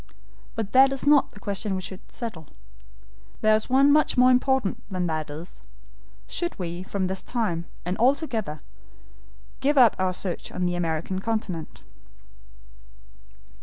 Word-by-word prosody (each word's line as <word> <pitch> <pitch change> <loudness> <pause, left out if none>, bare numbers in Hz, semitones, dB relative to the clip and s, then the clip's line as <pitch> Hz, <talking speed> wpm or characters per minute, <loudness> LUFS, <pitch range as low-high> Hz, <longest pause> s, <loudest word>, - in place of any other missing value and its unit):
But 215 -2 -3
that 265 +1 +6
is 270 0 -3
not 290 -1 +5
the 205 - -15
question 200 0 -2
we 185 - -4
have 190 +1 -8
to - - -22
settle. 195 - -5 0.9
There 215 0 +5
is 215 - -2
one 275 +2 +5
much 305 -3 +3
more 250 +1 +6
important 255 -4 +1
than 185 -2 -2
that 155 -2 -2
is 155 +5 -9 0.6
should 345 0 -4
we 175 -1 -4
from 190 0 -2
this 190 +1 -3
time, 175 -9 -2 0.2
and 180 +1 -1
all 255 +4 +5
together, 220 - -4 1.0
give 290 +2 +1
up 240 -5 +7
our 185 -1 +1
search 180 -2 -4
on 180 0 -2
the 175 - 0
American 170 +2 -2
continent?" 195 -6 -4
200 Hz, 155 wpm, -25 LUFS, 180-255 Hz, 1.0 s, up